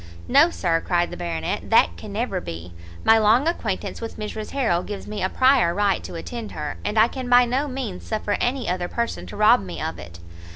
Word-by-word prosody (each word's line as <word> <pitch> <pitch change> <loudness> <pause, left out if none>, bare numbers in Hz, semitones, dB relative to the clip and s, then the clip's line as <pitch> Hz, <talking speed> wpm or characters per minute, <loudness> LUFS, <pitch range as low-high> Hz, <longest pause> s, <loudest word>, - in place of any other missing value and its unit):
"No, 290 +6 +6
Sir," 170 - 0
cried 175 -1 0
the - - -5
Baronet, 80 -1 -3
"that 85 - +4
can 85 - -9
never 205 -4 -2
be; 85 - -8 0.3
my 225 0 +6
long 225 +7 +4
acquaintance 335 - -3
with 230 - -6
Mrs 215 0 -5
Harrel 230 -11 +1
gives 205 +1 -7
me 210 0 -5
a 185 - +1
prior 255 -10 +3
right 200 -1 +1
to - - -8
attend 225 +6 -6
her, 150 -2 -5
and 210 +1 -2
I 220 +1 +6
can 255 0 -6
by 245 0 +6
no 260 +5 -1
means 255 -9 -5
suffer 215 -2 -2
any 255 +1 -1
other 180 0 -1
person 235 +5 -3
to - - -9
rob 210 - +5
me 90 -4 -7
of 80 0 -4
it." 85 0 -10
210 Hz, 215 wpm, -23 LUFS, 170-245 Hz, 0.3 s, No